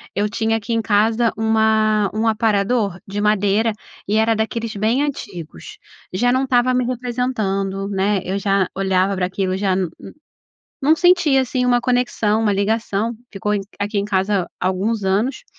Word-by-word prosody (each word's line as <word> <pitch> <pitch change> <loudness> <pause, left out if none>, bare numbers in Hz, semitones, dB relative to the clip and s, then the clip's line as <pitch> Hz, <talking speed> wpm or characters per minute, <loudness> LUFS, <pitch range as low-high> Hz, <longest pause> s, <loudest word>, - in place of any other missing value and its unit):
eu 205 +1 0
tinha 225 0 0
aqui 225 +2 -6
em 225 - +1
casa 220 +2 +2
uma 220 -2 +2
um 220 +1 0
aparador 210 -2 +1
de 200 +1 -5
madeira 210 +1 +2 0.3
e 210 - 0
era 220 +1 +3
daqueles 225 0 -2
bem 225 +7 +1
antigos. 175 - -7 0.4
Já 245 +6 +2
não 260 +1 +2
estava 255 -1 +2
me 250 -1 +1
representando, 220 -6 -2
né? 195 0 0
Eu 190 +2 -2
já 195 -2 +1
olhava 190 0 +1
pra 180 - +1
aquilo, 190 0 -2
já 195 -2 +1
nu 185 -2 -1 1.0
nu 300 - +3
não 320 - +6
sentia 350 -7 +4
assim 255 0 -1
uma 245 -1 +3
conexão, 240 -4 +1
uma 210 -2 +2
ligação. 215 +2 0 0.2
Ficou 210 +1 -2
em 200 - 0 0.2
aqui 205 +1 -2
em 200 - 0
casa 195 -2 0
alguns 195 +3 -1
anos 215 +8 0
215 Hz, 165 wpm, -20 LUFS, 195-235 Hz, 1.0 s, não